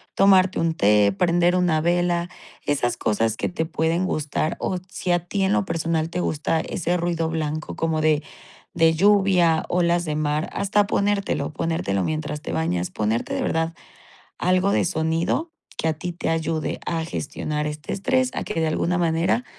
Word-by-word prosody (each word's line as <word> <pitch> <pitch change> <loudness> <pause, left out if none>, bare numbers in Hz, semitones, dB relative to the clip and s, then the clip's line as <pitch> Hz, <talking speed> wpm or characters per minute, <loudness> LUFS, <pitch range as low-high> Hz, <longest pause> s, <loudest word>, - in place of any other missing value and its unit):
tomarte 190 -1 +4
un 165 -1 +1
té, 105 -2 +4
prender 175 - +2
una 170 -4 +2
vela, 175 0 +1 0.4
esas 135 -4 0
cosas 110 +1 0
que - - -1
te 165 -2 -2
pueden 165 +3 0
gustar, 155 -1 -1
o 185 - -1
si 180 - -3
a 175 - +3
ti 195 +1 -1
en 190 +2 +2
lo 225 -3 +1
personal 165 -2 -1
te - - -2
gusta 160 -1 0
ese 175 +1 -1
ruido 165 -1 -1
blanco 155 -1 -3
como 160 -1 0
de 155 -1 +3 0.5
de 165 -1 +4
lluvia, 185 -3 +4
olas 175 0 +2
de 150 - -2
mar, 150 +1 -1
hasta 200 0 +1
ponértelo, 200 -7 0
ponértelo 160 - -1
mientras 155 -1 -3
te - - -5
bañas, 85 +2 -1
ponerte 110 +2 -1
de - - -1
verdad 165 0 0 0.7
algo 185 +2 +2
de - - +2
sonido 165 - 0 0.3
que 160 - 0
a 160 - +2
ti 175 +3 -5
te 170 - -4
ayude 160 -1 -2
a 165 -1 -1
gestionar 150 -1 -3
este 150 0 -5
estrés, 255 +6 +1
a - - -2
que 210 - -5
de 160 - +1
alguna 175 +3 0
manera 170 +7 +1
165 Hz, 175 wpm, -23 LUFS, 155-180 Hz, 0.7 s, tomarte